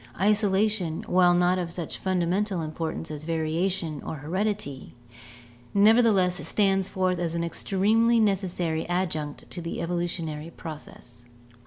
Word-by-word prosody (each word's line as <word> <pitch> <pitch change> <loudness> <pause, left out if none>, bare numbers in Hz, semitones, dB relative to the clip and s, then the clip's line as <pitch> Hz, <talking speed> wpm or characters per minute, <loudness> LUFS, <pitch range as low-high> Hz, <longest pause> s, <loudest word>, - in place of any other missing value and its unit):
Isolation, 205 -3 +1
while 180 -1 +4
not 180 +1 +3
of 170 -2 -3
such 170 -2 -5
fundamental 185 0 0
importance 160 +1 -4
as 150 0 -6
variation 165 0 -1
or - - -5
heredity, 170 -2 -3 0.8
nevertheless 205 -4 +5
stands 195 -2 +2
forth 185 -1 0
as 170 -1 -2
an 170 - -1
extremely 220 +7 +2
necessary 180 -6 0
adjunct 160 -5 -2
to 175 - -4
the 165 - -4
evolutionary 170 -2 -3
process. 145 -7 -9
175 Hz, 120 wpm, -26 LUFS, 160-195 Hz, 0.8 s, nevertheless